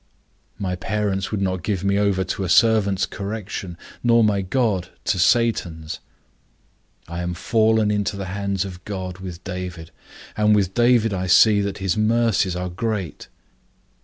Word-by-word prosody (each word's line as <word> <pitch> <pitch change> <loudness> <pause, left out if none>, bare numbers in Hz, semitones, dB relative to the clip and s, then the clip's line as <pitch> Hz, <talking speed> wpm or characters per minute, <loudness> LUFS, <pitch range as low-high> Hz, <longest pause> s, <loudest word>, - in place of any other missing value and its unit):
My 90 -2 -2
parents 100 +1 -2
would 100 -2 -2
not 95 -1 -1
give 95 0 -2
me 100 0 +2
over 100 -2 +1
to 95 - -3
a 90 - -3
servant's 100 -1 +4
correction, 100 -3 -6 0.2
nor 115 -1 +4
my 105 -2 +2
God 95 -3 0 0.2
to 95 - +1
Satan's. 85 -7 +1 1.1
I 85 +1 -5
am 90 0 -3
fallen 110 +2 +2
into 105 0 -1
the 100 - -4
hands 100 -1 -1
of 95 -1 -9
God 95 -3 -5
with 90 -2 -8
David, 90 -3 -6 0.4
and 105 0 +3
with 95 -2 +1
David 120 -2 +3
I 95 -1 -2
see 100 +3 +6
that 100 -1 -3
his 95 0 -1
mercies 110 -4 +2
are 90 0 -3
great. 95 -1 -4
100 Hz, 155 wpm, -22 LUFS, 90-105 Hz, 1.1 s, see